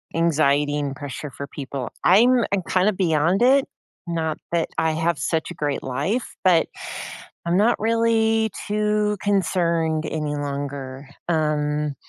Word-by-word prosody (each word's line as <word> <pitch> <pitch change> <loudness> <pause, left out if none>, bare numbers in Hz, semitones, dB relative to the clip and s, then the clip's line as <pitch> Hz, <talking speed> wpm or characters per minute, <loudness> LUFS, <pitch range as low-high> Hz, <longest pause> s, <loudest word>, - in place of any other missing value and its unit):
anxiety 150 -3 +2
and 140 -2 -3
pressure 145 +1 -7
for 140 +2 -7
people. 135 -3 -6
I'm 240 +7 +5
I'm 200 - +2
kinda 190 +3 +2
beyond 170 0 +1
it, 265 +2 +5 0.4
not 160 -2 -2
that 170 -1 0
I 160 - +2
have 160 +1 0
such 160 -1 -1
a - - -5
great 145 -2 -2
life, 195 - -2
but 180 -3 +4 0.8
I'm 170 +1 +2
not 220 +4 +3
really 225 0 +2 0.2
too 210 0 +1
concerned 170 -5 +1
any 150 -2 -2
longer, 140 -1 -5 0.2
um 150 -2 0
165 Hz, 135 wpm, -23 LUFS, 145-205 Hz, 0.8 s, I'm